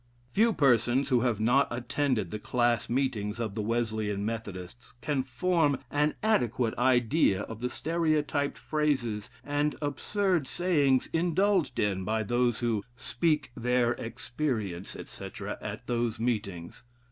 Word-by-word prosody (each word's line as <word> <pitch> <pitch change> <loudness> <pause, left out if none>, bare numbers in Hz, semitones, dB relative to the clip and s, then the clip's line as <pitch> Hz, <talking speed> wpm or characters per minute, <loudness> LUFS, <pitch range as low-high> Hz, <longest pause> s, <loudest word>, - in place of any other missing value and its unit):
'" 120 +1 -34
Few 225 +3 +4
persons 130 - +3
who 125 -3 +4
have 120 -3 +1
not 125 +6 +4
attended 120 - -1
the 105 - -4
"class 120 0 +1
meetings" 120 -4 -1
of 110 -4 -2
the 110 - -2
Wesleyan 110 -2 -1
Methodists 105 -1 -6
can 135 +2 0
form 145 +3 +1
an 150 +1 +1
adequate 125 - +1
idea 125 - +3
of 110 +1 -7
the 125 +1 -2
stereotyped 155 -1 0
phrases 130 -9 -1
and 145 +1 0
absurd 160 - 0
sayings 145 -8 +2
indulged 180 +2 +2
in 95 -2 0
by 110 +3 0
those 120 +2 +1
who 115 -4 0
"speak 150 +1 0
their 125 0 +2
experience," 115 - -3
etc., - - -7
at - - -6
those 120 -2 -1
meetings. 105 -4 -3
125 Hz, 135 wpm, -29 LUFS, 110-145 Hz, -, Few